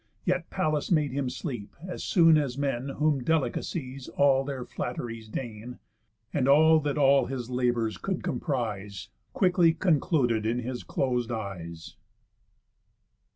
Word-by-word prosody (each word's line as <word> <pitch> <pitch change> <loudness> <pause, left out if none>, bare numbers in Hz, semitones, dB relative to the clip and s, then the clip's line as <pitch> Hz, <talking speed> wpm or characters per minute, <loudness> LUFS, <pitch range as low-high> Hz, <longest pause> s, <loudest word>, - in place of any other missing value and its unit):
Yet 180 -1 0
Pallas 155 -6 -1
made 150 -5 +2
him 135 -1 -1
sleep 125 -5 -6
as 180 - -5
soon 165 -3 +5
as 140 -4 0
men 140 -2 -1
Whom 145 -1 0
delicacies 135 -2 -2
all 135 -1 +3
their 135 -3 -5
flatt'ries 115 -3 -5
deign, 115 +1 -6 0.6
And 135 -3 +1
all 160 +3 +6
that 145 -1 -2
all 140 -2 +4
his 125 -2 -5
labours 120 -3 0
could 190 -2 -3
comprise 105 - -3 0.2
Quickly 180 -4 +3
concluded 145 - +2
in 115 +2 0
his 125 0 -4
closed 125 -3 -1
eyes. 90 -7 -6
135 Hz, 130 wpm, -28 LUFS, 120-150 Hz, 0.6 s, all